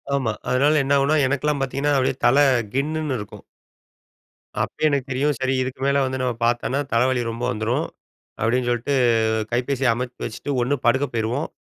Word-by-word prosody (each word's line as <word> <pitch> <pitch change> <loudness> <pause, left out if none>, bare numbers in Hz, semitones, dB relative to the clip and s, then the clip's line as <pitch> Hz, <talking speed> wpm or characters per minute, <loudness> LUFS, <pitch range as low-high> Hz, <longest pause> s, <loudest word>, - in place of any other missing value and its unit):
ஆமா. 130 -5 0 0.2
அதனால 145 +5 +3
என்னாகுனா, 140 +2 +2
எனக்கிலாம் 145 +1 0
பாத்திங்கன்னா, 140 +2 0
"அப்படியே 130 -1 +1
தல 135 +4 +5 0.4
கின்னுன்னு 150 0 -1
இருக்கும்." 105 - -10 1.2
அப்பயே 155 - -1
எனக்கு 140 -2 -1
தெரியும்." 140 +3 +1
சரி, 130 0 0
இதுக்கு 130 0 -6
மேல 140 0 +2
வந்து, 130 0 -3
நம்ம 125 -1 0
பாத்தனா, 120 +3 0
தலவலி 125 +2 +2
ரொம்ப 115 +2 -6
வந்துரும்." 120 +8 -1 0.6
அப்படின்னு 120 +3 +1
சொல்ட்டு, 120 +4 -1 0.6
கைப்பேசிய 125 +1 0
அமத்தி 125 +1 -5
வச்சுட்டு, 115 +5 -5
ஒண்ணு 135 +4 +1
படுக்க 130 +4 +3
போயிருவோம். 115 +6 -1
130 Hz, 150 wpm, -22 LUFS, 120-140 Hz, 1.2 s, தல